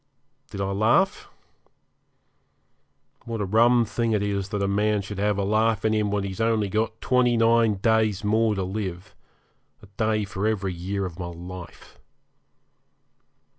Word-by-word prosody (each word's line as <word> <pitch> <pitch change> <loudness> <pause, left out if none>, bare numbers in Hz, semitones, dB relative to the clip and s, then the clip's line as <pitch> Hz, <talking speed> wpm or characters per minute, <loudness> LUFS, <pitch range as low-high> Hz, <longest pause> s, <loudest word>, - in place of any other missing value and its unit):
Did 100 - -6
I 95 0 -1
laugh? 105 +3 +1 2.0
What 115 -1 -4
a 105 - -1
rum 115 +4 +4
thing 115 +1 -1
it 105 -1 +1
is 100 -1 -2
that 105 -1 -2
a - - +1
man 105 +1 +1
should 105 0 -7
have 105 0 +1
a 100 - 0
laugh 110 +1 +1
in 110 - +2
him 105 -1 +1
when 100 -1 -1
he's 100 +2 -5
only 110 -3 +1
got 110 +2 -1
twenty 125 -2 +2
nine 115 -1 +3
days 110 0 +1
more 110 +1 +2
to 95 - -2
live 95 0 -5 0.7
a - - -11
day 110 -1 +1
for 100 +2 -3
every 100 -4 -1
year 95 +3 -3
of 90 -1 -8
my 90 - -4
life. 85 +1 -10
105 Hz, 160 wpm, -25 LUFS, 100-110 Hz, 2.0 s, rum